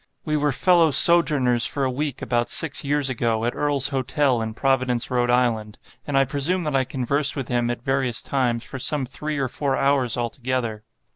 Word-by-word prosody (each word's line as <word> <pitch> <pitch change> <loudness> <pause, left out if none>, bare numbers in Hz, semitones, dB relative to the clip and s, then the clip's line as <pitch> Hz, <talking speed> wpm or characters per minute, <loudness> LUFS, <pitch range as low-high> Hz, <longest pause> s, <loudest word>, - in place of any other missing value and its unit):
We 155 -2 -1
were 150 -1 +1
fellow 170 +3 +3
sojourners 145 -7 +3
for 140 -2 -3
a 130 - 0
week 140 +1 -4
about 120 -1 -1
six 160 -2 +3
years 145 -1 0
ago, 115 -3 -1
at 120 - -1
Earl's 145 -2 +1
Hotel, 135 -2 0
in 110 -1 -5
Providence, 130 -2 0
Rhode 120 -1 0
Island; 115 -4 0 0.3
and 145 -2 0
I 135 - +4
presume 145 +7 -1
that 150 -3 -2
I 130 -1 +2
conversed 140 +3 0
with 135 -4 -5
him, 120 -1 0
at 120 0 -4
various 135 -3 -1
times, 120 -4 -1
for 130 - -8
some 145 +1 0
three 150 +4 -5
or 135 -2 -1
four 135 +2 -2
hours 135 -4 +1
altogether. 120 -2 -3
130 Hz, 195 wpm, -22 LUFS, 120-145 Hz, 0.3 s, I